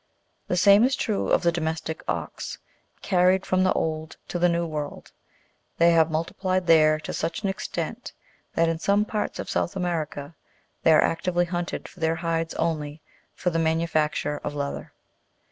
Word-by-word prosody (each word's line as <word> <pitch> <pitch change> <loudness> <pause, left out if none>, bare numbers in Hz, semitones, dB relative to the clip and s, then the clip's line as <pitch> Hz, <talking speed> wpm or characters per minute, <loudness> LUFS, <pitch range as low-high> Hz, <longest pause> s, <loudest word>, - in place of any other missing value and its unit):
The 180 - 0
same 200 +4 +7
is 260 +2 +3
true 215 -7 -1
of - - +3
the 170 - +4
domestic 160 -1 -3
ox: - - -4 0.5
carried 185 0 +3
from 185 0 +2
the 185 - +3
Old 155 0 -3
to 175 - -2
the 175 0 +4
New 170 0 0
World, 150 -3 -5 0.7
they 170 0 +5
have 165 -1 +4
multiplied 185 +3 -1
there 155 -2 +5
to - - -5
such 165 +5 -3
an 200 - +1
extent 190 - -4 0.4
that 165 0 +3
in 165 0 -1
some 200 +4 +2
parts 215 -1 -3
of - - -5
South 175 - -1
America 165 -5 -3 0.5
they 160 - +5
are 155 - +6
actively 175 +1 +1
hunted 175 0 -4
for 185 - -17
their 160 0 +1
hides 165 -1 -2
only, 155 -2 -2 0.4
for 180 - -1
the 165 - 0
manufacture 160 -2 0
of 145 - -4
leather. 140 -1 -4
165 Hz, 170 wpm, -25 LUFS, 160-180 Hz, 0.7 s, same